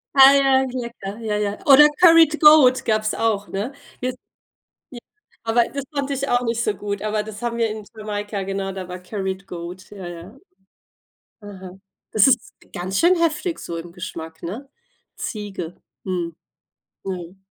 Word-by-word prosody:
Ah, 270 +1 +9
ja, 265 -1 +4
lecker. 235 -4 -6
Ja, 215 -2 -2
ja. 205 0 -2
Oder 290 +1 +9
Curied 330 -3 +7
Goat, 300 -4 +7
gab's 215 -1 0
auch, 215 -3 0
ne? 205 +7 -4 0.3
Jet 255 0 -2 0.8
J 240 - -8 0.4
aber 230 +1 +3
das 280 -1 -3
fand 280 -1 -2
ich 275 0 -2
auch 245 0 +3
nicht 230 0 -1
so 215 - +1
gut, 200 0 -4
aber 215 0 0
das 215 +1 -9
haben 235 -1 -2
wir 230 -1 +1
in 215 0 -6
Jamaika 205 -1 -4
genau, 195 0 -3
da 185 -1 -7
war 180 0 -6
Curried 190 0 -5
Goat, 175 +2 -8
ja, 190 -4 -8
ja. 175 +8 -10 1.8
Das 215 +1 +5
ist 255 - +1 0.2
ganz 185 +2 -3
schön 355 +2 +5
heftig 335 +1 0
so 170 - -6
im 170 +1 -8
Geschmack, 165 -2 -8
ne? 230 +11 -6 0.5
Ziege. 195 -6 -5 0.3
Mhm. 175 -3 -3 0.7
Mhm. 180 -1 -6
215 Hz, 160 wpm, -22 LUFS, 190-255 Hz, 1.8 s, Ah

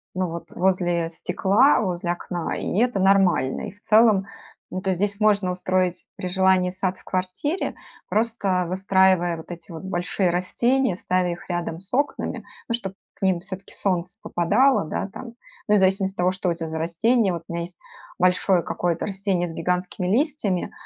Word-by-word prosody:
ну 185 0 0
вот, 170 +1 -7
возле 175 -2 +1
стекла, 200 - +3
возле 175 -3 -1
окна 175 -1 -3
и - - -3
это 240 -4 +2
нормально. 190 -8 +3
И - - -11
в 205 +2 -25
целом, 215 -3 +4 0.4
ну, 185 - -4
то 190 - -2
есть 185 - -1
здесь 205 0 0
можно 205 -3 +3
устроить 185 0 -1
при 185 - -4
желании 190 0 +3
сад 185 0 -2
в - - -19
квартире, 185 - -2 0.3
просто 205 -5 0
выстраивая 190 -2 +3
вот 160 - -11
эти 170 +1 -9
вот 165 +1 -8
большие 180 0 0
растения, 235 +6 +1
ставя 180 0 0
их 170 +2 -8
рядом 175 -2 -3
с 190 +2 -4
окнами, 285 +3 -1 0.3
ну 235 - +2
чтоб 195 -5 -6 0.3
к - - -9
ним 185 -2 +3
все-таки 190 +1 -7
солнце 185 0 -1
попадало, 250 - +2
да, 175 - -3
там. 235 +2 -9 0.3
Ну 210 - +4
и - - +6
в - - +4
зависимости 190 0 +2
от - - -42
того, 180 +1 +2
что 185 -1 -2
у - - +2
тя 165 -1 -5
за 160 0 -4
растение. 195 +7 +2
Вот 170 -1 -5
у - - -8
меня 170 - -2
есть 175 0 -7 0.4
большое 180 0 +3
какое-то 170 -1 -1
растение 195 -3 -1
с 165 - -7
гигантскими 180 +2 -2
листьями, 225 - 0
185 Hz, 185 wpm, -24 LUFS, 175-200 Hz, 0.4 s, и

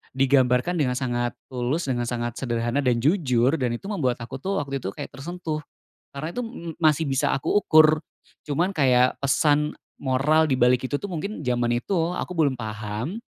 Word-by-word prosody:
digambarkan 130 +4 +2
dengan 125 -4 +1
sangat 120 -2 -1 0.2
tulus, 130 +6 -1
dengan 120 -1 -1
sangat 120 -1 -3
sederhana, 120 +1 -1
dan 125 -3 +2
jujur, 130 - +2
dan 120 -2 0
itu 120 - -10
membuat 130 - 0
aku 130 +3 -7
tuh 195 +4 -2
waktu 140 -1 -4
itu 95 - -4
kayak - - -7
tersentuh. 160 +1 -5 0.6
Karena 155 +4 -4
itu 245 - -2
m 170 -8 -7
masih 155 0 +4
bisa 135 -1 +1
aku 135 - -2
ukur. 155 0 +5 0.4
Cuman 170 +7 0
kayak 130 -3 +4
pesan 145 +2 +2 0.2
moral 145 +4 +2
di 130 - +2
balik 125 0 +4
itu 145 - 0
tuh - - -7
mungkin 185 -2 -5
zaman 120 -1 +1
itu 120 - -4 0.2
aku - - -4
belum 145 -6 +1
paham, 110 - -5
135 Hz, 175 wpm, -24 LUFS, 125-155 Hz, 0.6 s, ukur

